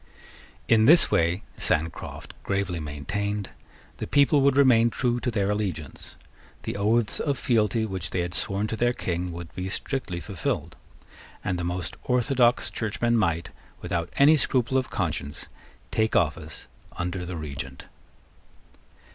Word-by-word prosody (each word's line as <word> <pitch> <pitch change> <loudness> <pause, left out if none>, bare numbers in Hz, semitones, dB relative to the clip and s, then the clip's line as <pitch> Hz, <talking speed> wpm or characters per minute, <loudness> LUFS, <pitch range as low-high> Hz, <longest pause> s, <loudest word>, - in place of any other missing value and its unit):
In 110 0 +5
this 165 +3 +7
way, 85 +3 +2
Sancroft 80 +1 -2
gravely 95 -3 -1
maintained, 100 +8 -3 0.5
the - - -4
people 145 0 +4
would 140 0 +4
remain 120 -4 +6
true 120 0 0
to 125 - -1
their 105 -3 0
allegiance: 95 -9 -4 0.5
the - - -4
oaths 105 +2 +1
of 140 -3 0
fealty 110 -1 +2
which 95 -4 -4
they 90 - -1
had 85 0 -3
sworn 100 +3 -1
to 110 - -3
their 120 +2 +2
King 90 -4 -3
would 85 -1 -8
be 90 +1 -4
strictly 100 -4 -3
fulfilled; 95 -1 -3 0.7
and 90 - -1
the - - -2
most 85 -1 -3
orthodox 125 -1 +2
Churchmen 115 +2 0
might, 85 -6 +1 0.3
without 85 -1 -2
any 150 +3 +7
scruple 130 -2 +1
of 130 -1 +1
conscience, 80 -5 -3 0.5
take 110 0 +1
office 75 -4 0 0.3
under 90 +1 -3
the 90 0 -5
Regent. 70 -4 -6
100 Hz, 140 wpm, -26 LUFS, 85-120 Hz, 0.7 s, this